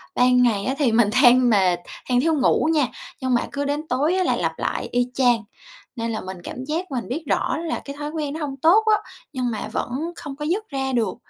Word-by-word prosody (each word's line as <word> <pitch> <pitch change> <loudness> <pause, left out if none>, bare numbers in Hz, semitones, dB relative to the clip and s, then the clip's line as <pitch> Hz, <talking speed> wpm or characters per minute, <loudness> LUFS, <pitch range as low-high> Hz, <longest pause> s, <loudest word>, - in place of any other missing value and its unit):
Ban 250 0 +4
ngày 210 -5 +1
á 265 - 0
thì 260 -6 +3
mình 225 -2 +4
than 250 0 +6
mệt, 190 -5 +3 0.3
than 245 0 +3
thiếu 325 +1 +2
ngủ 295 +2 +2
nha, 295 -5 +2 0.3
nhưng 260 -1 0
mà 240 - 0
cứ 285 0 -2
đến 295 +2 -2
tối 285 +7 +1
là - - +2
lặp - - -2
lại - - -2
y 245 0 +1
chang, 245 -4 +3 0.5
nên 230 -1 -3
là 220 - -3
mình 185 0 -7
cảm 255 - -6
giác 330 +5 -3
mình 250 -3 -3
biết 300 +7 -3
rõ - - 0
là 325 0 -3
cái 280 - -7
thói 295 0 -3
quen 300 -3 -3
nó 315 - -5
hông 275 -2 -4
tốt 340 +10 +5
á, 430 -1 +4 0.4
nhưng 250 -3 -1
mà 215 -1 -4
vẫn - - -2 0.3
không 290 -4 -7
có 295 - -4
dứt 400 +7 -2
ra 265 -2 -2
được. 235 -3 0
265 Hz, 240 wpm, -22 LUFS, 245-300 Hz, 0.5 s, than